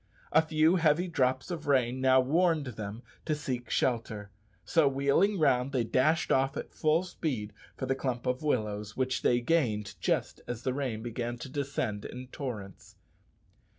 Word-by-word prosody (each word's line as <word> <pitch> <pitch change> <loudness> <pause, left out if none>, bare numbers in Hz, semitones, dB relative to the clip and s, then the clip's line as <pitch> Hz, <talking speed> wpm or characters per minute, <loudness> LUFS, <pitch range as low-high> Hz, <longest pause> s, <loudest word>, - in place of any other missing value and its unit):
A 160 - +6
few 160 +2 +3
heavy 165 +2 +3
drops 130 -1 0
of 160 -4 -5
rain 130 -2 +2
now 130 0 +5
warned 160 +3 +2
them 110 -1 -6 0.2
to 155 - 0
seek 130 -4 -4
shelter, 110 -5 -1 0.3
so 160 -4 +4
wheeling 140 +9 +2
round 135 -4 +2
they 125 -3 +2
dashed 150 +8 +2
off 135 +1 +2
at - - -6
full 155 +3 +2
speed 135 - -3 0.2
for 130 - -3
the 135 - +1
clump 130 -2 -3
of 125 0 0
willows, 105 -8 -1
which 130 0 0
they 120 0 +3
gained 120 -9 +1
just - - -1
as 120 -1 -5
the 130 - 0
rain 125 -5 -3
began 120 0 -3
to 130 - -8
descend 135 -7 -2
in 125 0 -8
torrents. 110 -9 -7
130 Hz, 165 wpm, -30 LUFS, 120-150 Hz, 0.3 s, A